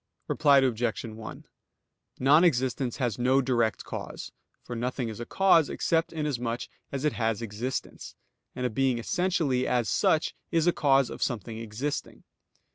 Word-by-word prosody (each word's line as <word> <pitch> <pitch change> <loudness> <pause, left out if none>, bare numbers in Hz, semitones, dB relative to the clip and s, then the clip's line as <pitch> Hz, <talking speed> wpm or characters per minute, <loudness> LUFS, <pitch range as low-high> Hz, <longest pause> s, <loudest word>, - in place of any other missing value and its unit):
Reply 145 -3 +4
Obj. 120 -4 +1
1: 110 -1 -9 0.7
Non 145 +6 +5
existence 130 -5 +1
has 120 -4 -1
no 130 +2 +3
direct 120 -4 +1
cause; - - -7 0.3
for 120 - -6
nothing 125 0 -2
is 110 - -7
a 120 - -6
cause 185 -6 +4
except 165 0 0
inasmuch 125 -7 -2 0.3
as 140 +1 -3
it 150 - +2
has 115 -1 -1
existence, 115 +4 -5 0.4
and 125 - -3
a 125 - 0
being 130 +1 +1
essentially 155 -2 0
as 120 -3 +1
such 155 - +2 0.2
is 165 -1 +2
a 175 - +4
cause 135 -3 +3
of - - -8
something 115 -1 -2
existing. 115 +6 -4
125 Hz, 150 wpm, -28 LUFS, 115-145 Hz, 0.7 s, Non